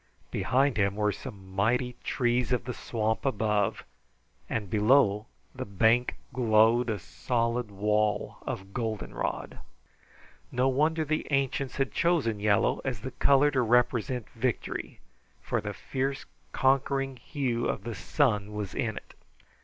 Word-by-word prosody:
Behind 135 -2 +2
him 100 -1 +2
were 105 0 +1
some 95 -1 -9
mighty 125 +5 +1
trees 120 0 +1
of 125 - +1
the 125 - -4
swamp 110 -2 -2
above, 105 -6 0 0.7
and 110 -3 -2
below 105 0 +3 0.3
the - - -5
bank 110 +5 +2 0.2
glowed 115 0 +4
a 110 - 0
solid 115 +4 -1
wall 105 +1 0
of 95 +1 -6
goldenrod. 110 -3 -3 0.9
No 125 +1 +2
wonder 155 +4 +1
the 155 +1 -1
ancients 135 -1 0
had 135 -1 0
chosen 150 -11 +1
yellow 105 -1 +2
as 125 -7 -3
the 130 - -5
color 140 +3 +4
to 130 -3 +2
represent 120 0 +1
victory, 120 0 -3 0.4
for - - -2
the - - -4
fierce, 135 +1 -3 0.3
conquering 135 0 +1
hue 125 -4 -2
of 100 - -2
the 115 +1 -4
sun 105 - 0
was 105 -3 -4
in 115 -5 -2
it. - - -10
120 Hz, 135 wpm, -28 LUFS, 105-130 Hz, 0.9 s, glowed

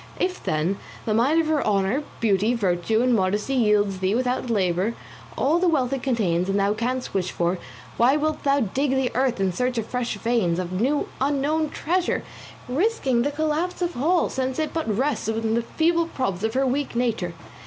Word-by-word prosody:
If, 365 0 -1
then, 160 +6 0 0.3
the 215 - 0
mine 265 +9 +3
of - - -3
her 310 -1 +1
honour, 200 +6 +1 0.2
beauty, 215 +2 +2
virtue, 205 +2 +1
and 250 -1 +3
modesty 205 +4 +1
yields 210 -5 +2
thee 190 +3 +1
without 250 0 -1
labour 195 +1 +1 0.4
all 315 +5 +2
the 365 - +2
wealth 275 -6 +1
it 270 - -2
contains 195 -9 0
and 195 +1 +1
thou 200 +1 +2
canst 250 +4 -3
wish 185 -2 0
for, 175 +1 -1 0.4
why 255 +5 +4
wilt 310 +1 -1
thou 280 0 +2
dig 265 +6 0
the 265 -2 +1
earth 255 -3 +1
in 190 -2 +1
search 250 +4 -1
of 225 - -1
fresh 250 -2 -2
veins, 215 -7 +1
of 185 +1 -3
new 285 +4 +1
unknown 290 +3 +1
treasure, 355 +4 -1 0.4
risking 270 - +1
the 280 - +1
collapse 315 +5 -1
of 350 0 -2
all, 330 +7 +2
since 260 0 -2
it 310 -1 -2
but 325 -8 -2
rests 260 +2 0
on 225 0 0
the 235 - +2
feeble 335 +7 +1
props 195 - -2
of 220 +2 -1
her 270 +1 +2
weak 270 0 -1
nature? 225 -8 -1
245 Hz, 195 wpm, -24 LUFS, 205-285 Hz, 0.4 s, why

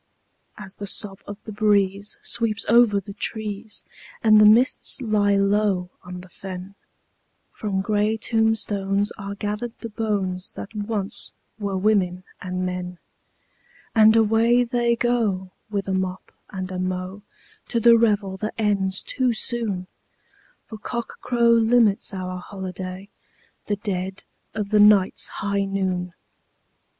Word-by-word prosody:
As 195 -2 -9
the 200 - -5
sob 195 0 0
of 205 - -7
the 220 - -7
breeze 200 -1 +1
sweeps 220 -3 +1
over 230 -3 +5
the 200 +1 -10
trees, 210 0 -4 0.4
and 215 -1 +7
the 210 - +8
mists 240 +6 +4
lie 210 -4 +2
low 200 -2 +1
on 180 0 -8
the 185 - -13
fen, 185 +1 -8 0.8
From 195 -3 -2
grey 210 +2 +1
tombstones 210 -3 0
are 200 0 -5
gathered 210 +4 -4
the 230 - -7
bones 200 -4 -2
that 200 - -8
once 205 -2 -1 0.3
were 200 -2 -2
women 185 -3 +1 0.2
and 185 0 -3
men, 180 0 -4 1.0
And 220 -1 +6
away 225 +2 +4
they 235 0 +1
go, 220 -6 0 0.2
with 200 -2 -3
a 190 - -1
mop 185 -1 -3 0.2
and 185 -1 -5
a 185 - -4
mow, 185 +2 -3 0.5
to 235 - 0
the 235 +1 +7
revel 205 -4 +1
that 215 +3 -4
ends 200 -3 +1
too 255 -2 +1
soon, 220 -6 0 0.8
For 220 - -10
cockcrow 235 +1 0
limits 230 -3 +3
our 185 -1 -5
holiday—the 190 +2 -8
dead 190 -2 -4 0.3
of 210 -2 -3
the 210 - +4
night's 205 -2 +5
high 200 0 -2
noon! 185 -2 -2
205 Hz, 130 wpm, -23 LUFS, 190-220 Hz, 1.0 s, the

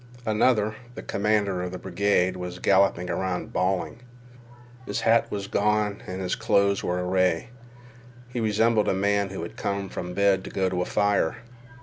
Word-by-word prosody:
Another, 110 -1 +2 0.2
the - - -7
commander 100 -3 0
of 90 0 -4
the 90 - -5
brigade, 95 0 +1
was 90 -1 -6
galloping 95 -2 +3
about 95 -1 -3
bawling. 90 -1 -1 0.9
His - - -2
hat 115 +1 +3
was 100 -1 -4
gone 105 0 0
and 95 +1 -4
his 90 - -1
clothes 100 0 +2
were 90 0 -1
awry. 90 0 +1 0.8
He 125 0 -5
resembled 110 0 +2
a - - +2
man 100 +1 +1
who 95 -3 -5
has 85 - -6
come 100 -1 -3
from 90 0 -6
bed 100 -2 +3
to - - -7
go 95 -1 0
to 90 -1 -1
a - - 0
fire. 100 -4 +1
100 Hz, 170 wpm, -25 LUFS, 90-105 Hz, 0.9 s, galloping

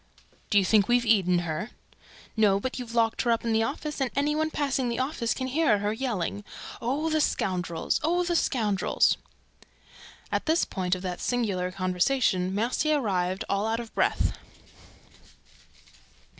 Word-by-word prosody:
"Do 205 - +3
you 195 - +4
think 205 0 +4
we've 240 0 +3
eaten 185 -6 +3
her?" 165 +8 -3 0.7
"No, 205 -3 +3
but 260 +5 -4
you've 235 -2 -7
locked 225 -1 +2
her 240 - -1
up 230 0 +1
in 230 - +1
the 220 - +3
office; 295 +4 -3
and 265 - +1
any 290 +2 +1
one 315 +1 0
passing 275 -5 -1
the 235 - -2
office 255 -3 -1
can 260 - -3
hear 260 -4 +2
her 205 +1 -1
yelling, 215 -5 -3 0.4
'Oh, 290 +7 -1
the 310 0 +2
scoundrels! 175 - -1
Oh, 350 +3 +2
the 345 0 -1
scoundrels!'" 215 - +2 1.1
At - - -1
this 320 +2 +3
point 185 -1 -1
of 185 - -8
this 180 -1 -4
singular 200 -7 -1
conversation, 185 +1 +1
Mercier 255 +8 +1
arrived, 185 -5 -1
all 200 +2 0
out 225 +1 0
of 235 -2 -8
breath. - - +1
225 Hz, 160 wpm, -27 LUFS, 195-270 Hz, 1.1 s, you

